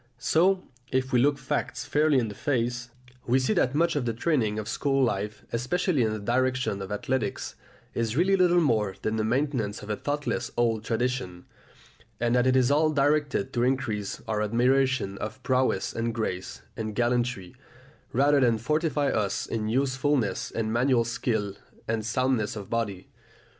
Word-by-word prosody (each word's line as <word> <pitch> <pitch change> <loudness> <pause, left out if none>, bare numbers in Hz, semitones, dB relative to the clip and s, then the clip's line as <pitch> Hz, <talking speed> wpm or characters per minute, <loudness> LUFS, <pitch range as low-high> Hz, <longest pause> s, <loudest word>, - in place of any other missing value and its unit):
So, 180 +9 +2 0.3
if 130 0 0
we 125 - +5
look 140 +3 +3
facts 130 -2 -3
fairly 150 0 +3
in 120 -3 +1
the 105 - -6
face, 120 -2 -1 0.4
we 125 +2 +4
see 130 +10 +1
that 140 -8 +1
much 170 +1 +2
of 140 -4 0
the 115 -2 -1
training 115 -7 +1
of 105 -1 -4
school 135 -2 +1
life, 105 -3 -2
especially 140 +6 0
in 110 -2 +2
the 110 - -2
direction 125 -1 0
of 95 +1 -6
athletics, 105 +1 -2 0.4
is 115 +1 -1
really 190 +4 +4
little 180 -2 +4
more 110 - +1
than 110 +1 0
the 110 - 0
maintenance 120 -4 -1
of 105 - -5
a - - 0
thoughtless 145 -3 -2
old 115 -2 +1
tradition, 115 -6 -2 0.7
and 120 +1 +1
that 125 +1 +3
it 130 - +3
is 130 0 +4
all 155 +2 +4
directed 145 -2 +1
to 120 - 0
increase 120 -6 -1
our 105 -1 0
admiration 125 -1 +1
of 120 +5 -6
prowess 130 0 +1
and 115 0 -2
grace 95 -5 -4
and 110 -1 -4
gallantry, 120 -5 0 0.6
rather 140 +3 +4
than 120 -4 +3
to 110 - -12
fortify 150 0 +1
us 105 -5 -1
in 110 -1 -3
usefulness 130 -1 0
and 110 -1 -2
manual 120 0 +3
skill 110 -4 -1 0.3
and 110 -1 -1
soundness 115 -1 0
of 100 -2 -8
body. 105 -5 -2
125 Hz, 170 wpm, -27 LUFS, 110-135 Hz, 0.7 s, we